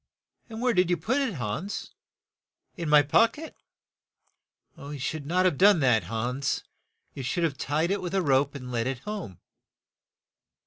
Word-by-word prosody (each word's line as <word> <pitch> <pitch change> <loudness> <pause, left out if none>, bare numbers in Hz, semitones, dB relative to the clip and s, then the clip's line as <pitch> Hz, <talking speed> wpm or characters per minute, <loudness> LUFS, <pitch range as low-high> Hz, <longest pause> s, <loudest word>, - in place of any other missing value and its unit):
"And 225 +1 -6
where 250 -1 +3
did 180 -3 +2
you 175 - +2
put 255 +9 0
it 255 -9 -1
Hans? 130 - -4 0.3
" - - -67
" - - -51
In 170 -5 -4
my 150 -1 +7
pock 225 - +3
et. 320 +1 -9 0.7
" - - -48
"You 145 +1 -7
should 140 +2 -4
not 180 +3 +2
have 180 -7 +1
done 200 -2 +6
that, 125 -5 +3
Hans; 125 +5 -2 0.5
you - - -6
should 135 +7 -1
have 160 -4 0
tied 155 +6 -1
it 200 - 0
with 180 +1 -4
a 190 - +3
rope 140 -1 +2
and 125 -2 -7
led 115 0 -1
it 135 -1 -2
home." 200 - -6
155 Hz, 185 wpm, -27 LUFS, 135-195 Hz, 0.7 s, my